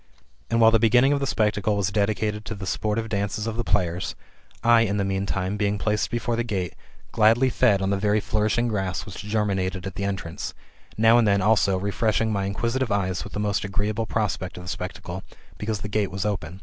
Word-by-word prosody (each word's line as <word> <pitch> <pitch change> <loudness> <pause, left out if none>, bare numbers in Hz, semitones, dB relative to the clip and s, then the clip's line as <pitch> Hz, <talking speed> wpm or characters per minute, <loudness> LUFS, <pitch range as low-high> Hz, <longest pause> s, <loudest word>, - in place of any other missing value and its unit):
And 115 - +1
while 115 0 +7
the 115 - +4
beginning 120 +5 +4
of 140 - 0
t^e 140 - 0
spectacle 105 -3 +1
was 95 -2 0
dedicated 105 +1 0
to 110 - -4
the 100 -1 -7
sportive 110 +3 -1
dances 105 +1 -2
of 115 -1 -3
the 120 - -2
players, 90 -3 0 0.5
I, 115 0 +6
in 105 -2 +1
the 100 - 0
meantime, 95 0 -1
being 105 0 0
placed 105 +1 0
before 120 0 -1
the 120 - 0
gate, 95 -7 -3 0.4
gladly 115 +4 +4
fed 100 -6 +3
on 95 - 0
the 100 - 0
very 105 +1 +2
flourishing 110 +3 0
grass 95 -6 -2
which 95 - -9
germinated 100 -3 -1
in 95 - -5
the 100 - -3
entrance; 95 -4 -4 0.4
now 115 +2 +6
and 115 - +3
then, 100 -1 +3
also, 100 -3 +3
refreshing 110 +3 0
my 100 -1 -1
inquisitive 115 +5 -1
eyes 95 -5 0
with - - -10
the - - -3
most 105 -1 0
agreeable 105 +2 -2
prospect 100 -5 -2
of 90 - -8
the 90 - -7
spec 90 +1 -4
tacle, 90 0 -7 0.4
because 105 -1 -2
the - - -4
gate 105 -1 0
was 95 +1 -3
open. 90 -4 -3
105 Hz, 215 wpm, -24 LUFS, 95-110 Hz, 0.5 s, while